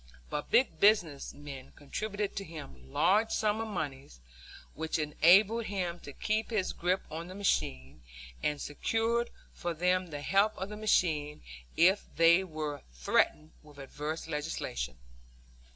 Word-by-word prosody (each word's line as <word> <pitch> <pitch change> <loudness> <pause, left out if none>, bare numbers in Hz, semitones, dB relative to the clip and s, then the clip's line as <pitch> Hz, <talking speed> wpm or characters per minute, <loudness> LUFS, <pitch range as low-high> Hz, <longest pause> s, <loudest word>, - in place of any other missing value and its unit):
But 150 - -3
big 235 +4 +3
business 200 -9 +3
men 140 -2 -10
contributed 205 +8 -4
to 200 - -2
him 70 - -10
large 210 +5 +3
sums 215 0 +1
of 225 - -3
money, 145 -9 -4 0.6
which 160 +1 -2
enabled 190 +9 +4
him 180 -4 -3
to 145 - -9
keep 215 +9 -1
his 210 -5 0
grip 180 +2 0
on 165 +2 -5
the 185 - -9
machine 65 - -1 0.4
and 150 -1 0
secured 225 +11 0 0.2
for 175 -1 -4
them 180 +2 +1
the 145 -3 -6
help 200 +6 +2
of 190 +2 -4
the 210 - -6
machine 160 -8 +1 0.3
if 190 +4 +5
they 170 +3 +6
were 155 -4 -4
threatened - - +1
with 150 -2 -17
adverse 150 +4 -5
legislation. 145 - -3
170 Hz, 140 wpm, -31 LUFS, 145-205 Hz, 0.6 s, they